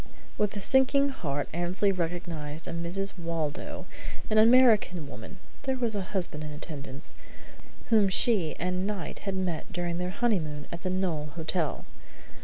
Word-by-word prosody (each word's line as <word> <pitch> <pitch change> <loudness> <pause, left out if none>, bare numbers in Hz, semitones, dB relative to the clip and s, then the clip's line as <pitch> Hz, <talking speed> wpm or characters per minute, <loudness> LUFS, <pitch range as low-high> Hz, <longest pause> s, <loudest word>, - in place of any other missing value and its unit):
With 210 0 0
a - - -1
sinking 265 +5 +4
heart 145 - -2
Annesley 175 +4 +1
recognized 165 -4 -3
a - - -3
Mrs. 180 +3 0
Waldo, 165 -3 -3 0.5
an 215 - +5
American 220 - +5
woman 115 - -9 0.2
(there 265 -1 -1
was 235 -3 0
a 205 - -1
husband 180 -5 -3
in 155 - -5
attendance) 145 -2 -7 0.8
whom 210 -3 +6
she 190 -5 +4
and 180 +2 -1
Knight 200 -6 -4
had 195 - -2
met 185 0 -2
during 175 -2 -2
their 180 0 -1
honeymoon 170 -9 0
at 170 - -6
the 185 - -2
Knowle 175 -5 -1
Hotel. 160 -1 -1
180 Hz, 150 wpm, -29 LUFS, 160-205 Hz, 0.8 s, whom